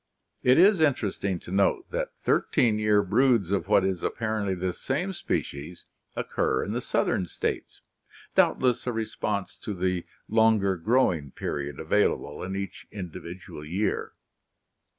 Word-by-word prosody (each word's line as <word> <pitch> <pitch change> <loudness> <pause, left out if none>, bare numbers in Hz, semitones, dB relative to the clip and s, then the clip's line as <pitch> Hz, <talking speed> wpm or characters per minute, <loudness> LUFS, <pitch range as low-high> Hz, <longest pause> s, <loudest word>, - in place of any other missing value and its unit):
It 125 +1 +5
is 190 +2 +6
interesting 105 - +1
to - - -10
note 100 +1 +1
that - - -3
thirteen 110 -3 +2
year 105 -1 +3
broods 110 -1 +3
of 95 -3 0
what 100 -2 +4
is 95 -2 -1
apparently 110 -4 -1
this 90 0 -3
same 190 +2 -1
species 75 - -4 0.3
occur - - 0
in - - -4
the - - -2
southern 90 - 0
states, - - -4 0.5
doubtless 125 -1 +2
a - - +2
response 105 -3 -3
to 105 - -5
the 90 -1 -1 0.2
longer 110 -3 +3
growing 90 - +1
period 70 +1 -4
available 75 +1 0
in 95 +1 -4
each 100 0 -6
individual 90 -4 -8
year. 90 +8 -2
100 Hz, 135 wpm, -27 LUFS, 90-110 Hz, 0.5 s, is